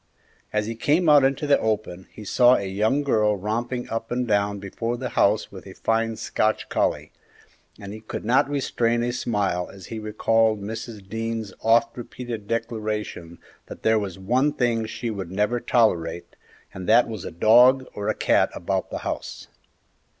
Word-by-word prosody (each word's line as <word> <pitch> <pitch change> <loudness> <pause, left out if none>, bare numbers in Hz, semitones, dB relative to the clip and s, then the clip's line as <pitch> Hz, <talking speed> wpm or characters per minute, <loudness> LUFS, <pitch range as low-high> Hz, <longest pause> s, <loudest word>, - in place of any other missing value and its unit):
As 105 0 0
he 115 - -3
came 150 +9 +1
out 145 -2 +7
into 135 +2 +1
the 145 -1 +4
open, 105 -4 -2
he 110 - -11
saw 125 +4 +5
a 100 - -2
young 110 +9 +1
girl 105 -6 +2
romping 120 +5 -3
up 115 0 -4
and 125 0 -1
down 100 -1 +1
before 115 +5 -4
the 125 0 -4
house - - +2
with - - -11
a - - -10
fine 115 0 0
Scotch 110 0 -1
collie, - - -1 0.7
and 100 0 -8
he 110 - -8
could 110 - -7
not 125 +4 +3
restrain 120 -4 0
a 120 0 -1
smile 100 -7 -1
as 95 -1 -12
he 110 - -4
recalled 110 0 +1
Mrs. 110 0 -7
Dean's 115 0 -4
oft 115 +1 +3
repeated 120 -3 -7
declaration 110 -7 -4 0.3
that - - -10
there 110 0 +3
was 95 -3 -5
one 125 +10 +1
thing 115 -3 0
she 115 +1 -4
would 95 -5 -5
never 105 +5 0
tolerate, 85 -9 0 0.4
and 95 +1 -6
that 120 +2 +6
was 110 -5 -6
a - - -5
dog 125 +9 +5
or 105 - -3
a - - 0
cat - - +2
about 95 +1 -2
the - - -4
house. - - -5
110 Hz, 175 wpm, -24 LUFS, 100-120 Hz, 0.7 s, out